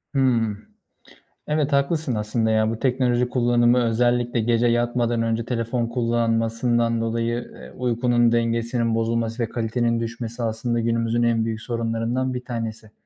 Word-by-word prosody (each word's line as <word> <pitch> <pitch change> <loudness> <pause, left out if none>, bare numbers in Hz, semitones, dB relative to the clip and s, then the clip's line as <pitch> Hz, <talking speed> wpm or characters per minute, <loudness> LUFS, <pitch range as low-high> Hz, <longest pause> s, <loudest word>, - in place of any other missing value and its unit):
Hımm. 115 -6 +1 0.8
Evet, 150 -1 0
haklısın 140 -1 +1
aslında 110 +1 0
ya. 110 0 +2
Bu 115 - -4
teknoloji 125 -1 +1
kullanımı 120 0 +3
özellikle 120 +1 +1
gece 115 +1 +2
yatmadan 120 0 +1
önce 115 0 -1
telefon 115 0 -1
kullanmasından 115 0 0
dolayı, 115 +1 -2
eee, - - -12
uykunun 120 -1 +2
dengesinin 115 0 0
bozulması 115 +1 -1
ve 115 - -3
kalitenin 115 0 0
düşmesi 115 +1 -5
aslında 115 +1 -1
günümüzün 115 0 0
en 115 -1 +2
büyük 110 -1 -3
sorunlarından 115 +2 -2
bir 125 0 -5
tanesi. 110 -3 -5
115 Hz, 135 wpm, -23 LUFS, 115-120 Hz, 0.8 s, kullanımı